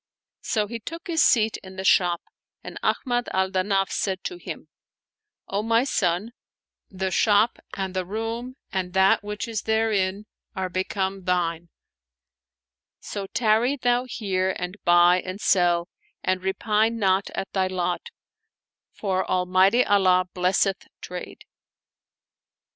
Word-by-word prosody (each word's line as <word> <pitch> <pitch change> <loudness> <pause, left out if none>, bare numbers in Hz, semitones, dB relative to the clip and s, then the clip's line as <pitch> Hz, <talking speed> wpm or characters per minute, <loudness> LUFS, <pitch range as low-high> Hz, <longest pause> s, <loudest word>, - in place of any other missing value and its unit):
So 215 -1 0
he 230 +2 -6
took 330 - -8
his 335 -3 +1
seat 220 -3 +4
in 190 0 -12
the 190 - -5
shop 175 -2 +3 0.4
and - - -8
Ahmad 245 -2 0
al 190 0 +1
Danaf 195 0 +1
said 190 -2 -2
to 360 - -4
him, - - -8 0.4
" 425 -1 -65
O 200 - +2
my 230 +2 +2
son, 190 -4 0 0.6
the 190 -1 -3
shop 210 +4 +3 0.2
and 190 -1 -3
the 185 - 0
room 225 +6 -4 0.2
and 185 -2 -3
that 190 +1 +4
which 210 +2 -4
is 225 -3 -3
therein 210 -3 0 0.3
are 190 -1 -2
become 190 +1 -2
thine; 170 -2 -1 1.3
so 200 -2 -6
tarry 230 +4 +2
thou 245 0 +1
here 190 -6 -1
and 180 +1 -4
buy 175 +1 +5
and 185 +2 -6
sell; 175 -3 +2 0.4
and 185 0 0
repine 215 +4 +1
not 195 -2 +2
at 195 - -4
thy 190 -1 +1
lot, 180 -1 -2 0.8
for 190 -2 -1
Almighty 185 +6 +3
Allah 185 -2 +4
blesseth 185 +2 +1
trade." 180 0 -8
195 Hz, 135 wpm, -24 LUFS, 185-220 Hz, 1.3 s, buy